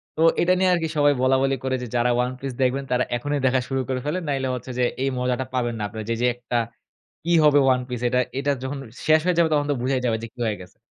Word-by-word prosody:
তো 160 - -2 0.2
এটা 180 +1 +4
নিয়ে 185 - +3
আরকি 165 -2 0
সবাই 145 0 +5
বলাবলি 135 +1 +3
করে 130 0 0
যে, - - -5
যারা 120 +1 +2
ওয়ান 125 +1 +1
পিস 135 0 -3
দেখবেন 130 +2 +1
তারা 125 0 +2
এখনই 145 +3 -2
দেখা 130 0 +3
শুরু 135 -1 0
করে 130 -1 -1
ফেলেন। 180 +5 -2
নাহলে 135 -2 -1
হচ্ছে 125 +1 -7
যে, 125 - +3 0.2
এই 135 - +1
মজাটা 125 +1 -1
পাবেন 120 -2 0
না 105 - -2
আপনারা 110 +1 -7
যে, 115 - +1
যে, 125 - +3
একটা 120 0 -3 0.7
কি 170 - +2
হবে 145 -1 +6
One 125 0 -2
Piece? 125 -1 -4
এটা-এটা 130 +3 0
যখন 135 +2 -4 0.3
শেষ 155 0 +6
হয়ে 180 -2 +1
যাবে 165 -1 +4
তখন 145 -1 +2
তো - - +1
বুঝাই 130 0 0
যাবে 115 -2 +1
যে, 115 - -4
কি 125 - -20
হয়ে 105 -2 -1
গেছে। 90 - -14
130 Hz, 255 wpm, -23 LUFS, 125-145 Hz, 0.7 s, হবে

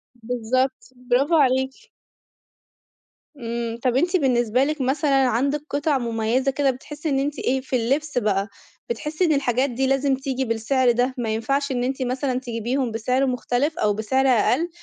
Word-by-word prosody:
بالضبط، 250 +3 -2 0.2
برافو 275 +7 +3
عليكِ. 265 -2 +1 1.5
إمم، 235 -1 -4
طَب 250 -2 +1
أنتِ 350 +7 +2
بالنسبة 250 -4 +2
لِك 300 0 -1
مثلًا 270 0 +2
عندِك 275 +5 0
قِطَع 290 0 +1
مُميّزة 235 +2 0
كده 270 0 +1
بتحسي 295 +4 -6
إن 270 - +1
أنتِ 285 +1 -2
إيه 260 +1 0
في 260 - -3
اللبس 275 +5 0
بقى، 205 -4 +1 0.4
بتحسي 300 +9 -1
إن 315 - +3
الحاجات 270 -1 +1
دي 260 +2 -1
لازم 270 0 +2
تيجي 265 -1 -3
بالسعر 240 +3 +2
ده؟ 245 +2 0
ما 235 -2 -2
ينفعش 275 +5 -1
إن 245 -1 -1
أنتِ 265 +1 -2
مثلًا 255 0 -1
تجيبيهم 245 +1 -2
بسعر 250 +5 0
مختلف 255 +5 -1
أو 210 -1 +2
بسعر 260 +6 +1
أقل؟ 255 +7 +2
260 Hz, 160 wpm, -23 LUFS, 240-275 Hz, 1.5 s, برافو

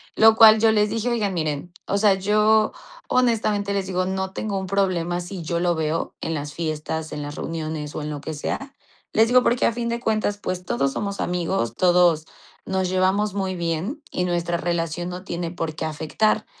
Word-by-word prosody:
lo 220 0 +7
cual 220 -1 +8
yo 225 0 +5
les 210 -1 +2
dije: 225 +3 -1
"Oigan, 215 -5 0
miren, 155 +1 -2 0.2
o 200 - +1
sea, 205 -2 +5
yo 215 +2 +3 0.4
honestamente 215 -5 +1
les 195 -1 -1
digo, 185 -1 0
no 190 0 -2
tengo 205 -1 -3
un 190 - -5
problema 180 -3 0
si 180 +1 -7
yo 170 +1 -1
lo 175 0 +1
veo 160 +1 -2
en 165 - -2
las 145 -1 -5
fiestas, 155 0 -3
en 150 - -4
las 145 0 -6
reuniones 155 -2 -4
o - - -3
en 150 - -4
lo 150 -1 -4
que 160 - -5
sea. 270 - -4 0.4
Les 220 +1 +5
digo 250 +1 +5
porque 245 0 +2
a - - +3
fin 235 0 -2
de 235 0 -1
cuentas, 215 -3 0
pues 185 -3 -4
todos 140 -5 0
somos 200 -1 -3
amigos, 175 - -1
todos 175 -2 +4 0.4
nos 190 -1 0
llevamos 190 +2 +1
muy 190 -2 -2
bien 175 - -3
y 180 - -1
nuestra 175 -1 0
relación 170 0 -2
no 180 +1 -6
tiene 170 -2 -4
por 165 -2 -4
qué 160 - -3
afectar, 160 +7 0
185 Hz, 200 wpm, -23 LUFS, 165-210 Hz, 0.4 s, cual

